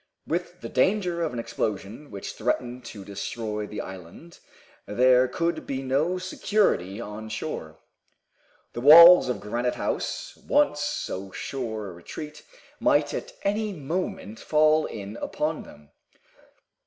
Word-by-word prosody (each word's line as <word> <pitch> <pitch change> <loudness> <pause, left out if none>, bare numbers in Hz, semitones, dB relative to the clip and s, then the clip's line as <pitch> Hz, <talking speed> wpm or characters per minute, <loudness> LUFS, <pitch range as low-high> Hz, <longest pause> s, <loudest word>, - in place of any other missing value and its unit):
With - - -3
the - - -5
danger 185 -4 +1
of 165 - 0
an 125 - -6
explosion 115 +2 -4
which 100 - -7
threatened 125 +2 -2
to 100 -4 -9
destroy 105 +1 -4
the 105 - -5
island 95 - -11 0.5
there 125 +4 +4
could 170 +5 -2
be 135 -1 -3
no 145 +8 +1
security 185 - 0
on 110 -1 -7
shore. 80 - -5 1.0
The 120 - -5
walls 170 +3 +10
of 125 - -1
Granite 120 +4 -2
House, - - -3
once 290 - +2
so 100 -9 -3
sure 110 -6 -4
a - - -9
retreat, 150 - -9 0.4
might - - +2
at - - -5
any 210 +1 0
moment 155 - -4
fall 155 0 +3
in 100 +2 -7
upon 155 +5 -2
them. 75 0 -15
125 Hz, 130 wpm, -26 LUFS, 105-160 Hz, 1.0 s, walls